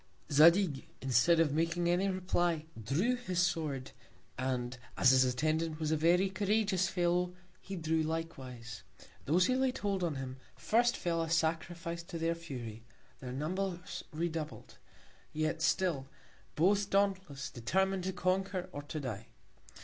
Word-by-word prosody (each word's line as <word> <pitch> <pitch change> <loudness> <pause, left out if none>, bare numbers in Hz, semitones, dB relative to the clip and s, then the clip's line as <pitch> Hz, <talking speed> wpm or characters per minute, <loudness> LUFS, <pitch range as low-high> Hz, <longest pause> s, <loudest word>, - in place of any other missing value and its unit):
Zadig, 160 0 +5
instead 135 +6 +4
of 155 -4 +3
making 170 +2 +1
any 180 +3 +2
Reply, 175 -4 0 0.2
drew 170 - +1
his 185 -8 -3
Sword, 155 -7 0 0.4
and 125 -1 -2 0.2
as 130 - +6
his 130 0 +6
Attendant 155 +5 0
was 155 -1 -1
a - - +3
very 170 +5 +4
couragious 200 -1 +1
Fellow, 180 0 +1 0.3
he 195 - -6
drew 160 -2 0
likewise. 130 - -5 0.4
Those 175 +5 +4
who 255 - +2
laid 260 -1 +1
hold 195 -2 -1
on 165 -4 0
them, 130 -1 -5 0.2
first 240 +2 +2
fell 170 -1 0
a 165 - -2
Sacrifice 170 +1 -1
to 170 0 -7
their 165 +1 +1
Fury: 125 -9 -7 0.4
Their 125 -2 -6
Numbers 180 +6 -3
redoubled: 160 -1 -4 0.5
Yet 155 +1 -1
still, 160 -6 +1 0.5
Both 200 +5 +3
dauntless, 190 -9 0
determin'd 190 +9 0
to 190 - -1
conquer 185 0 -1
or 145 - -5
to 145 +2 -5
die. 115 -6 -5
165 Hz, 140 wpm, -33 LUFS, 145-185 Hz, 0.5 s, as